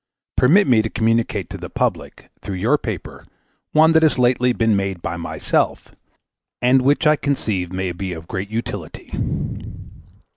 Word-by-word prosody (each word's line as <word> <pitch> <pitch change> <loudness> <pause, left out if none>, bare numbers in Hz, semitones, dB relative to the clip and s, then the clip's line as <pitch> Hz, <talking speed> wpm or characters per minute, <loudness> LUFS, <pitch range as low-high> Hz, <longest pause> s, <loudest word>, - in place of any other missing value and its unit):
Permit 175 +11 +5
me 120 -4 +4
to 110 - -3
communicate 115 +1 0
to - - -6
the - - -7
public, - - -3
through 100 - -5
your 115 +11 +2
paper, 110 - -6 0.5
one 160 +1 +5
that 160 0 +5
has 155 -3 +3
lately 125 0 +3
been 115 -3 +2
made 100 -2 -2
by 85 0 -4
myself, 85 - -2 0.7
and 125 +2 +4
which 140 +4 +2
I 150 0 +6
conceive 110 - -2
may 95 0 -2
be 90 +2 -5
of 80 -1 -8
great 95 +1 -4
utility. 115 +2 -6
115 Hz, 155 wpm, -20 LUFS, 95-130 Hz, 0.7 s, I